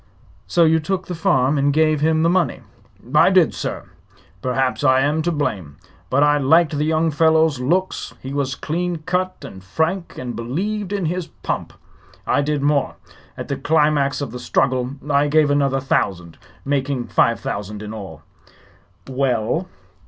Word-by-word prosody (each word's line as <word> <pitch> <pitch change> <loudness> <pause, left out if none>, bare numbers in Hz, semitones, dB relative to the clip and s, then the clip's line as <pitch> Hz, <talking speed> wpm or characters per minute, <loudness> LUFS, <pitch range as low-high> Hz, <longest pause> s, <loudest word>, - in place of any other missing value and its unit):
"So 170 - +3
you 160 0 +4
took 185 +4 -3
the 180 - -5
farm 150 -6 +2
and 140 +1 +2
gave 155 0 +2
him 160 +1 +2
the - - +4
money?" 185 -2 0 0.5
"I - - +6
did, - - +4
sir. - - -4 0.6
Perhaps 130 +1 -1
I 130 -2 +4
am 150 +3 +1
to 175 +2 0
blame; 95 - -3 0.3
but 140 +3 +3
I 145 0 +3
liked 155 +3 +3
the 150 +1 0
young 160 +1 +1
fellow's 160 -2 +3
looks. 180 +9 -1
He 135 +1 -7
was 140 -2 -1
clean 175 +3 -2
cut 180 -4 -2
and 95 -8 -10
frank, 160 - -2
and 125 -1 -5
believed 195 - -3
in 200 -3 -1
his 175 +1 -2
pump. - - -5 0.5
I 145 - +2
did 145 -1 -1
more. 145 -2 +1 0.4
At - - -6
the - - -3
climax 150 -2 +1
of 140 - -4
the 125 - -7
struggle 125 +1 0
I 145 0 +2
gave 150 0 +3
another 140 -2 +2
thousand, 90 -10 -2 0.3
making 135 -2 -1
five 115 -2 +2
thousand 105 +1 -5
in 105 +1 -7
all." 100 -4 -9 0.8
"Well?" 130 +4 -1
145 Hz, 165 wpm, -20 LUFS, 130-160 Hz, 0.8 s, I